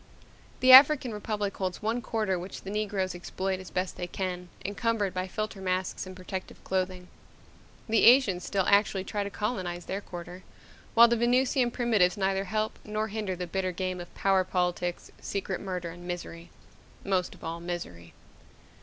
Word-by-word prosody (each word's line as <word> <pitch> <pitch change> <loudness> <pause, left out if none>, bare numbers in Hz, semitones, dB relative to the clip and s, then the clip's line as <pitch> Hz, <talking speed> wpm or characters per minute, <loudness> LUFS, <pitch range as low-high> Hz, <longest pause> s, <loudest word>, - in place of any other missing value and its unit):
The 255 0 +7
African 265 -2 +8
Republic 210 -1 -3
holds 185 +1 -3
one 230 +3 0
quarter 215 -5 -1
which 185 +2 -8
the 195 - -6
Negroes 205 -3 -1
exploit 185 +2 -3
as 185 - -9
best 185 0 -3
they 175 - -4
can, 180 -1 -4 0.2
encumbered 205 -1 0
by 185 0 -2
filter 215 +1 -4
masks 185 0 -2
and 185 - -9
protective 185 0 -7
clothing. 185 -1 -2 0.8
The 220 -1 +4
Asians 230 -8 +6
still 195 0 0
actually 200 -1 +3
try 205 +1 -2
to 200 - -4
colonize 185 -4 -3
their 195 +2 -3
quarter, 175 -1 -9 0.5
while 235 +1 +9
the 235 0 +1
Venusian 245 +1 +2
primitives 220 -7 +2
neither 195 0 0
help 215 +3 -2
nor 215 +1 -2
hinder 205 -3 -3
the 180 0 -4
bitter 185 +1 -2
game 185 0 -3
of 175 - -10
power 195 -1 +3
politics, 180 -1 -2
secret 195 -2 -3
murder, 180 -3 -4
and 175 +1 -11
misery 170 -1 -6 0.5
most 185 -3 0
of - - -18
all, 165 +1 -4
misery. 165 - -6
190 Hz, 165 wpm, -28 LUFS, 180-215 Hz, 0.8 s, while